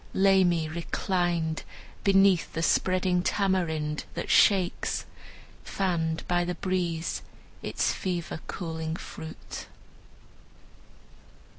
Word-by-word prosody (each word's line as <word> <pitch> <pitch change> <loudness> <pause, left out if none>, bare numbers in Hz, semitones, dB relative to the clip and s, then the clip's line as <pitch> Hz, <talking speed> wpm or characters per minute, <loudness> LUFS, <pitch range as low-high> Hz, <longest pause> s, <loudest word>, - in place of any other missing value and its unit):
Lay 195 0 +5
me 170 -3 +2
reclined 170 0 -1 0.4
Beneath 195 -3 +4
the 165 - -1
spreading 185 0 +2
tamarind, 170 -6 0
that - - -3
shakes, 190 -3 +3 0.6
Fanned 165 -4 -1
by 175 0 +2
the 175 0 -2
breeze, 175 -3 -1 0.4
its - - 0
fever 175 -3 -3
cooling 160 -2 -4
fruit." 160 -2 -8
175 Hz, 90 wpm, -28 LUFS, 160-185 Hz, 0.6 s, Lay